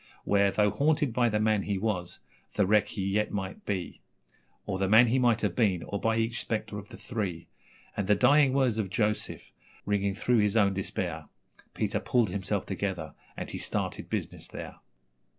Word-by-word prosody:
Where, 100 0 +3
though 105 +1 +2
haunted 145 - +1
by 120 0 +3
the 105 -1 0
man 110 -1 +2
he 100 0 -2
was, 95 -4 -2 0.3
the 105 - +3
wreck 105 +1 +3
he 100 - -4
yet 105 +2 0
might 95 -2 -4
be, 95 -4 -3 0.6
Or 95 - -3
the 95 -1 +1
man 110 +4 +8
he 125 +3 +2
might 120 -3 +3
have 100 -5 0
been, 95 -7 +2
or 100 - -4
by 115 0 +1
each 115 +1 0
spectre 110 -2 -3
of 100 - -12
the - - -10
three, 100 -8 -4 0.5
And 100 -2 -2
the 105 - +5
dying 145 +5 +5
words 130 -5 +2
of 100 -3 -1
Joseph, 105 +2 -1 0.3
ringing 100 -1 0
through 120 +3 +2
his 105 +1 +2
own 100 -2 +4
despair, 95 0 -3 0.5
Peter - - 0
'pulled 120 -5 +1
himself 100 +1 -2
together' 95 -5 -3 0.2
and - - -5
he - - -5
started - - -3
business - - -4
there. - - -8
105 Hz, 185 wpm, -29 LUFS, 95-115 Hz, 0.6 s, man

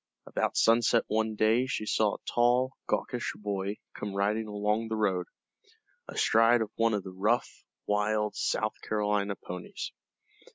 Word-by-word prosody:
About - - -1
sunset 115 0 +4
one 110 0 0
day 110 +4 +3
she 110 - -2
saw 105 -1 +2
a - - -7
tall, 125 +2 +3
gawkish 125 -2 -1
boy 100 -1 -3 0.2
come 100 -2 -5
riding 105 +2 0
along 105 +2 0
the 110 - -2
road, 95 -5 0 0.8
astride 115 +1 +4
of 105 - -8
one 115 -1 +2
of 100 - -2
the 95 - -7
rough, 105 +6 0 0.2
wild, 105 0 +1
South 110 0 -1
Carolina 105 -1 0
ponies. 90 -1 -7
105 Hz, 140 wpm, -29 LUFS, 105-115 Hz, 0.8 s, sunset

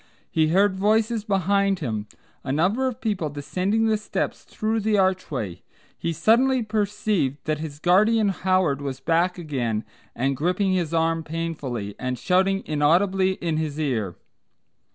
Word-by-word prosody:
He 160 -1 +3
heard 190 +3 +3
voices 220 +2 +2
behind 200 -1 +1
him, 110 -9 -3 0.4
a 130 - -3
number 190 - +1
of 250 -3 -4
people 200 -9 -1
descending 185 +10 -1
the 220 -1 +2
steps 210 - -3
through 220 +1 -2
the 215 0 +1
archway; 155 - -1 0.3
he 170 - -3
suddenly 235 - +3
perceived 205 -9 0
that 155 -1 -1
his 155 -2 -6
guardian 210 +6 +3
Howard 185 -6 +1
was 135 -2 -4
back 170 +6 +1
again 125 -10 -2 0.3
and 135 +3 0
gripping 180 +6 +1
his 175 -4 0
arm 165 0 +1
painfully, 150 -10 -4
and 130 0 -2
shouting 190 +6 +1
inaudibly 185 +6 +2
in 165 -4 -2
his 155 -1 -3
ear. 115 - -1
175 Hz, 145 wpm, -24 LUFS, 145-200 Hz, 0.4 s, He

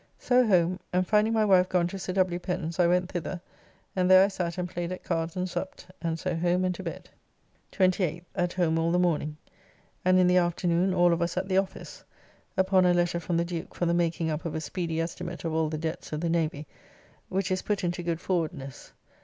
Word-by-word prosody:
So 250 -1 +3
home, 180 -2 +3
and 180 +1 +1
finding 215 +3 +3
my 220 -1 +3
wife 185 -2 +4
gone 180 -2 +2
to 195 - -6
Sir 185 - -4
W. 180 -2 +1
Pen's, 175 -1 -4
I 175 - +5
went 180 +1 +1
thither, 175 +1 -4 0.6
and 180 -1 +2
there 185 +1 +8
I - - -1
sat 180 -3 -3
and 180 0 -2
played 175 0 -4
at 185 - -6
cards 165 -1 -2
and 185 0 -1
supped, 185 +1 -5 0.2
and 165 -1 -1
so 180 +1 -2
home 175 +2 +1
and 180 - 0
to - - -8
bed. - - -7 0.6
28th. 180 -3 +1
At 175 0 -1
home 165 -3 +1
all 165 +1 +1
the 175 - +2
morning; 155 -4 0 0.7
and 185 0 +4
in 185 - +5
the 180 0 +4
afternoon 175 +1 +1
all 175 -1 +5
of 170 - -1
us 170 +1 -1
at 185 +1 -1
the 190 -1 +1
office, 190 -1 -6 0.5
upon 190 0 +4
a 175 - +4
letter 175 0 +1
from 170 0 -2
the 170 - +1
Duke 170 -2 -6
for 175 - -1
the 170 - +2
making 165 -1 0
up 155 +1 -3
of 165 - -4
a 160 - -2
speedy 165 -1 -3
estimate 170 +1 -4
of 165 - -1
all 160 -1 +1
the 155 - -3
debts 160 +1 -5
of 150 - -2
the 170 - 0
Navy, 155 -3 -1 0.6
which 190 0 -1
is 185 - 0
put 205 -2 -2
into 175 0 -1
good 170 -1 -2
forwardness. 160 -7 -3
175 Hz, 230 wpm, -27 LUFS, 165-185 Hz, 0.7 s, there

